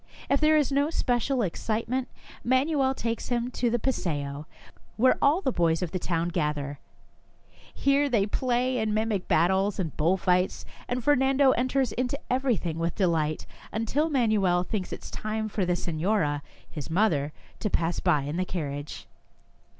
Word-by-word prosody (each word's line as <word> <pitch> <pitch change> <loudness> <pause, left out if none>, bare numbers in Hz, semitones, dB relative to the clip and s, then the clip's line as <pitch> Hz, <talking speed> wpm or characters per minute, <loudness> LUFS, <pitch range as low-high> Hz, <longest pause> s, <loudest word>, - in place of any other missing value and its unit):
If 280 - +3
there 310 0 +5
is 290 -2 +1
no 285 +2 +2
special 250 -4 0
excitement, 230 +7 -2 0.4
Manuel 265 +1 +2
takes 230 -2 -3
him 245 0 -1
to 240 -1 0
the 240 - +1
paseo, 150 - -2 0.5
where 255 +3 +5
all 295 +7 +4
the 265 - 0
boys 170 -3 +1
of 170 - -3
the 185 - -2
town 170 -1 -1
gather. 145 -3 -2 0.9
Here 280 +1 +2
they 220 -6 +2
play 250 +3 0
in 215 -1 0
mimic 215 -3 -1
battles 190 +5 +2
and 165 -6 -3
bull 170 +5 +3
fights, 180 0 +1 0.2
and 245 0 -2
Fernando 270 0 +4
enters 255 0 +1
into 250 +2 -2
everything 235 -11 0
with 165 0 -1
delight, 160 -5 0 0.3
until 260 +9 0
Man 250 -7 +2
uel 180 -4 +2
thinks 185 0 -3
it - - -6
is - - -9
time 215 0 -3
for 205 -3 -1
the 180 - +2
senora, 165 -3 0 0.3
his 150 0 -7
mother, 160 -6 +1 0.3
to 210 - -1
pass 170 -2 0
by 155 -6 +2
in 145 +4 -3
the 185 - +1
carriage. 145 -5 -5
215 Hz, 165 wpm, -27 LUFS, 170-255 Hz, 0.9 s, there